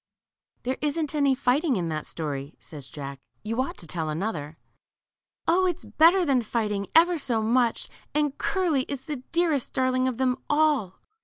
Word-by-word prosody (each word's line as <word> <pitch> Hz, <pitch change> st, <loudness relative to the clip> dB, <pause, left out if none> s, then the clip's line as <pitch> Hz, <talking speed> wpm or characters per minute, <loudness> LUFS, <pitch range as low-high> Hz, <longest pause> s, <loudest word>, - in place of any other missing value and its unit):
There 260 Hz, +2 st, -2 dB
isn't 300 Hz, 0 st, -1 dB
any 280 Hz, -3 st, +3 dB
fighting 270 Hz, +3 st, +2 dB
in 175 Hz, -4 st, -1 dB
that 155 Hz, -1 st, -3 dB
story/' 145 Hz, -2 st, -5 dB
says 145 Hz, -4 st, -10 dB
Jack 140 Hz, -2 st, -7 dB
j 215 Hz, -, -14 dB
you 230 Hz, +3 st, +1 dB
ought 265 Hz, -, -4 dB
to -, -, -7 dB
tell 160 Hz, -1 st, -3 dB
another." 155 Hz, -3 st, -3 dB, 0.9 s
0; 370 Hz, +3 st, +4 dB
it 355 Hz, -, +1 dB
is -, -, -14 dB
better 345 Hz, +4 st, +5 dB
than 270 Hz, -4 st, +3 dB
fighting, 210 Hz, -3 st, -2 dB
ever 340 Hz, +1 st, +5 dB
so 245 Hz, -5 st, 0 dB
much, 235 Hz, +1 st, +2 dB, 0.2 s
and 295 Hz, -2 st, +1 dB
Curly 350 Hz, -8 st, +1 dB
is 280 Hz, -3 st, -4 dB
the 295 Hz, -3 st, -6 dB
greatest 335 Hz, -6 st, +1 dB
darling 255 Hz, 0 st, +1 dB
of 255 Hz, -3 st, -2 dB
them 255 Hz, -1 st, +1 dB
all 295 Hz, -, +2 dB
255 Hz, 175 wpm, -26 LUFS, 190-300 Hz, 0.9 s, better